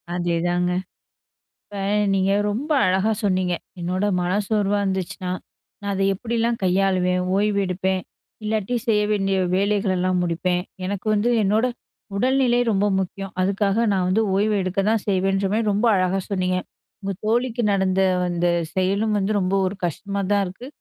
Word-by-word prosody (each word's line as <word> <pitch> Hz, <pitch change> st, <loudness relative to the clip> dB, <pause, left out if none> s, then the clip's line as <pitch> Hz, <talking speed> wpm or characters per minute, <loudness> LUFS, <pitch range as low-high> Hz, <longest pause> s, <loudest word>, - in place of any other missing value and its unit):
அதேதாங்க. 175 Hz, +1 st, 0 dB, 1.0 s
இப்ப 205 Hz, -1 st, -7 dB, 0.3 s
நீங்க 195 Hz, 0 st, +2 dB, 0.2 s
ரொம்ப 285 Hz, +9 st, -3 dB
அழகா 190 Hz, +4 st, +2 dB
சொன்னீங்க. 185 Hz, -2 st, +1 dB, 0.3 s
என்னோட 185 Hz, +3 st, -1 dB, 0.2 s
மன 175 Hz, +1 st, -1 dB, 0.2 s
சோர்வா 205 Hz, -2 st, +1 dB
இருந்துச்சுனா, 190 Hz, -1 st, -3 dB, 0.5 s
நான் 200 Hz, 0 st, -2 dB
அத 195 Hz, -, -2 dB
எப்பிடில்லாம் 230 Hz, +2 st, -1 dB
கையாளுவேன்? 185 Hz, -1 st, +2 dB, 0.2 s
ஓய்வு 205 Hz, 0 st, +2 dB
எடுப்பேன், 185 Hz, +1 st, -1 dB, 0.4 s
இல்லாட்டி 215 Hz, +2 st, -1 dB
செய்ய 210 Hz, -2 st, +3 dB
வேண்டிய 195 Hz, -2 st, +1 dB, 0.2 s
வேலைகளெல்லாம் 190 Hz, -2 st, +1 dB
முடிப்பேன். 180 Hz, +1 st, 0 dB, 0.2 s
எனக்கு 200 Hz, +2 st, -4 dB
வந்து 210 Hz, +3 st, +2 dB
என்னோட 215 Hz, +5 st, +2 dB, 0.5 s
உடல்நிலை 255 Hz, 0 st, +2 dB
ரொம்ப 200 Hz, 0 st, +2 dB
முக்கியம். 195 Hz, +1 st, -4 dB
அதுக்காக 200 Hz, +4 st, +1 dB
நான் 185 Hz, -2 st, +1 dB
வந்து 215 Hz, +4 st, +2 dB
ஓய்வு 210 Hz, +2 st, +2 dB
எடுக்க 185 Hz, +1 st, -2 dB
தான் 220 Hz, -2 st, +1 dB
செய்வேன்றமாரி 195 Hz, +3 st, +1 dB
ரொம்ப 210 Hz, +4 st, +1 dB
அழகா 185 Hz, +1 st, +1 dB
சொன்னீங்க. 185 Hz, -1 st, 0 dB, 0.4 s
உங்க 195 Hz, 0 st, -3 dB
தோழிக்கு 240 Hz, +2 st, +1 dB
நடந்த 190 Hz, -1 st, +1 dB, 0.3 s
அந்த 175 Hz, 0 st, 0 dB, 0.3 s
செயலும் 200 Hz, +3 st, +1 dB
வந்து 200 Hz, +1 st, 0 dB
ரொம்ப 190 Hz, 0 st, 0 dB
ஒரு 185 Hz, -, -2 dB
கஷ்டமா 200 Hz, +4 st, -3 dB
தான் 200 Hz, -1 st, +3 dB
இருக்கு. 190 Hz, +8 st, -8 dB
195 Hz, 140 wpm, -22 LUFS, 185-210 Hz, 1.0 s, செய்ய